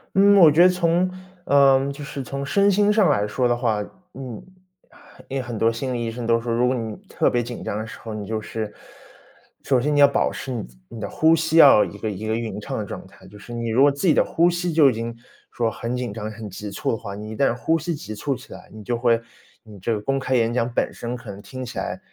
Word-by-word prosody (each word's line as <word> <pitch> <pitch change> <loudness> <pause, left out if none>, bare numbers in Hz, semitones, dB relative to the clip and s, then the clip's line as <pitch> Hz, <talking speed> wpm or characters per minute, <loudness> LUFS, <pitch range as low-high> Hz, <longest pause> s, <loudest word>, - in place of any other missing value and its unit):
嗯， 200 +1 +6
我 165 -5 +8
觉 155 +4 +4
得 180 - +8
从 180 0 +1 0.4
呃， 140 -1 +4
就 145 +1 -8
是 140 -1 -6
从 140 +1 -5
身 200 +7 +3
心 205 +1 +3
上 210 -6 +4
来 105 -8 +2
说 125 +4 0
的 120 0 +1
话， 115 -4 0 0.3
嗯， 130 -5 -8 0.8
因 135 - -6
为 - - -1
很 120 -2 -6
多 115 +2 +3
心 130 +3 -4
理 120 -2 -2
医 115 - -3
生 115 0 -5
都 115 0 +3
说， 115 0 -3
如 120 +2 +2
果 130 - +1
你 110 -3 -4
特 - - +1
别 120 - +1
紧 120 0 -7
张 105 - -3
的 110 - -5
时 - - -10
候， 115 -1 -7
你 105 -1 -5
就 110 +1 -2
是 110 0 -5 0.9
首 130 -3 +2
先 150 +4 0
你 - - +3
要 140 - +8
保 140 - 0
持 135 - -6
你 120 - -4 0.2
你 115 - -10
的 105 - -4
呼 160 +1 +4
吸 160 0 0
要 140 -9 +8
一 100 - -6
个 110 +1 -3
一 105 +2 -6
个 110 - 0
匀 110 -3 -4
称 135 +5 -5
的 105 - -3
状 - - -8
态。 95 - -19
就 105 +2 -14
是 120 - -12
你 115 -1 -3
如 115 +4 +2
果 145 +1 +6
自 140 +7 -2
己 160 - +6
的 - - +4
呼 170 +2 +2
吸， 175 0 -2
就 155 -3 +5
已 - - -4
经 115 +1 -5 0.3
说 115 -2 -1
很 120 +3 -4
紧 125 -4 -4
张、 105 0 -5
很 110 0 -8
急 105 +2 -7
促 100 - -2
的 115 - -1
话， 100 -2 -7
你 105 +1 -7
一 - - -6
旦 120 0 +2
呼 160 +7 0
吸 165 +1 -3
急 110 -7 -8
促 135 +6 -2
起 - - -12
来， - - -13
你 110 -1 -11
就 120 +3 -1
会 120 -1 +2 0.4
你 105 -3 -13
这 95 - -2
个 - - -3
公 135 +6 -1
开 130 -1 -1
演 115 -1 +2
讲 120 0 0
本 - - 0
身， 120 +1 -5
可 120 -3 -9
能 100 +1 -10
听 130 +5 -7
起 120 - -6
来 - - -4
120 Hz, 295 characters per minute, -23 LUFS, 110-140 Hz, 0.9 s, 我